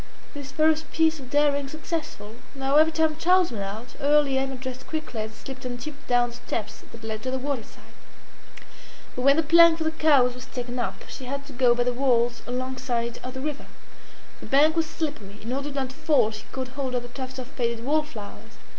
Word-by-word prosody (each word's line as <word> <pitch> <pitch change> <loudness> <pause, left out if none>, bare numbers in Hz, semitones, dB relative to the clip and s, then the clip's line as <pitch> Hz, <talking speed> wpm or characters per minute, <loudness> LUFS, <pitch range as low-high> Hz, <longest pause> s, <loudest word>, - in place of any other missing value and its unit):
This 285 -3 -7
first 315 +2 +2
piece 320 -1 +2
of 260 -2 -10
daring 285 -1 +2
successful, 300 -8 -5 0.2
now 270 +1 +2
every 315 +1 +6
time 315 -1 +2
Charles 360 0 +4
went 210 -4 -3
out 215 +5 -6
early 290 -1 +3
Emma 270 0 0
dressed 260 0 -7
quickly 310 -8 -4
and 215 0 -4
slipped 265 +4 -9
on 245 -1 -4
tiptoe 285 +3 -9
down 245 -1 +3
the - - -11
steps 220 -3 -4
that 230 -1 -12
led 220 -1 -4
to 255 - -3
the 260 - -1
waterside. 260 -3 -5 1.2
But 250 - -3
when 275 +2 +6
the 325 - +3
plank 335 +1 +7
for 325 - -2
the 315 - +1
cows 285 -6 +4
was 250 +1 -10
taken 245 -1 -5
up, 240 - -3
she 260 - -8
had 280 +2 -4
to 280 - -11
go 245 -1 +4
by 245 - +2
the 250 0 0
walls 240 -2 +2
alongside 250 -2 -2
of 255 +1 -6
the 260 - -4
river; 295 0 -4 0.7
the - - -10
bank 300 +4 +5
was 325 -1 +1
slippery; 285 - -5
in 230 +4 -4
order 280 +2 -3
not 270 -2 -2
to - - -14
fall 255 -9 +3
she 215 - -9
caught 260 -1 -4
hold 260 -1 -3
of 245 - -1
the 240 - -9
tufts 260 +1 -7
of 255 - -5
faded 235 -3 -2
wallflowers. 290 -8 -3
265 Hz, 215 wpm, -26 LUFS, 245-295 Hz, 1.2 s, plank